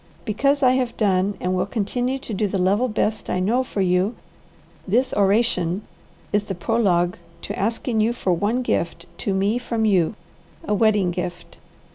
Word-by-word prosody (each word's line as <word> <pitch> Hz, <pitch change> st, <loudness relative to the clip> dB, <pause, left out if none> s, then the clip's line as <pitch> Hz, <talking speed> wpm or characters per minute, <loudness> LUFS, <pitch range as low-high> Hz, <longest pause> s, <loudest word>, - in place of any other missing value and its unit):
Because 275 Hz, +6 st, +1 dB
I 255 Hz, -, +6 dB
have 255 Hz, -2 st, 0 dB
done 195 Hz, -1 st, +1 dB
and 180 Hz, +1 st, -1 dB
will 185 Hz, +1 st, 0 dB
continue 245 Hz, +5 st, -1 dB
to 250 Hz, -4 st, -7 dB
do 205 Hz, +1 st, 0 dB
the 195 Hz, -, -2 dB
level 200 Hz, +7 st, +2 dB
best 215 Hz, -1 st, -1 dB
I 185 Hz, -, 0 dB
know 230 Hz, +8 st, +2 dB
for 210 Hz, -5 st, -3 dB
you, 185 Hz, +4 st, +2 dB, 0.7 s
this 245 Hz, +7 st, +2 dB
oration 195 Hz, -2 st, +2 dB, 0.5 s
is 205 Hz, 0 st, +2 dB
the 195 Hz, -, -4 dB
prologue 180 Hz, -3 st, +1 dB, 0.3 s
to -, -, -5 dB
asking 225 Hz, +2 st, 0 dB
you 220 Hz, +2 st, +2 dB
for 195 Hz, -6 st, 0 dB
one 210 Hz, +8 st, 0 dB
gift 170 Hz, -6 st, -1 dB
to 200 Hz, -, -1 dB
me 200 Hz, +5 st, +1 dB
from 230 Hz, -2 st, -1 dB
you, 190 Hz, -2 st, +2 dB, 0.5 s
a 265 Hz, -, -1 dB
wedding 210 Hz, -4 st, +3 dB
gift. 175 Hz, 0 st, -6 dB
205 Hz, 170 wpm, -22 LUFS, 185-235 Hz, 0.7 s, I